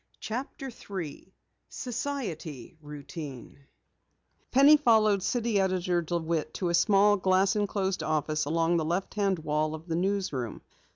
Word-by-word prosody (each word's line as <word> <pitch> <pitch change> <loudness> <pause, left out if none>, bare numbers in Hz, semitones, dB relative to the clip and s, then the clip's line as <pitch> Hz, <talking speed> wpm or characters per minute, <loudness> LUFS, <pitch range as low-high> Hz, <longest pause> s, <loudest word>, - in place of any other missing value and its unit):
CHAPTER 260 +3 -5
3 190 -6 -7 0.4
SOCIETY 205 - -5
ROUTINE 145 -2 -9 0.8
Penny 280 +4 +7
followed 220 -8 +4
City 230 +1 0
Editor 185 -2 +1
DeWitt 165 -1 -2
to 180 - -1
a - - 0
small, 205 +3 +4
glass 190 +2 +2
enclosed 195 -3 -1
office 155 -1 0
along 165 +3 +1
the 160 - 0
left 175 +4 -2
hand 200 -2 +1
wall 155 0 -1
of 160 +1 -11
the 165 -2 -2
newsroom. 175 - -2
180 Hz, 125 wpm, -28 LUFS, 155-205 Hz, 0.8 s, Penny